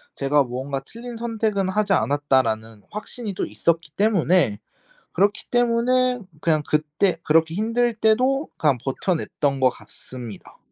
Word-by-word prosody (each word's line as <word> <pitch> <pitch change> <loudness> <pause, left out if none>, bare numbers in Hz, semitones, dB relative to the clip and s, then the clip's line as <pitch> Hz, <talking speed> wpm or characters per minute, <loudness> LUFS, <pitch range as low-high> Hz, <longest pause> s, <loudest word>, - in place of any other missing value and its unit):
제가 145 +1 +2
뭔가 135 +2 -4
'틀린 235 +1 -8
선택은 220 -4 -1
하지 205 +2 0
않았다.'라는 130 - +1
확신이 210 0 -6
또 - - -2
있었기 160 +8 -1
때문에 185 - +2 0.5
그렇기 200 +3 +1
때문에 245 +1 +2 0.2
그냥 155 -2 +2
그때 155 +5 +1
그렇게 160 +1 +3
힘들 230 +4 +1
때도 255 +7 +2
그냥 145 -4 +3
버텨 140 +7 0
냈던 140 -3 -2
것 130 -1 +5
같습니다. 120 -5 -11
180 Hz, 300 characters per minute, -23 LUFS, 140-225 Hz, 0.5 s, 것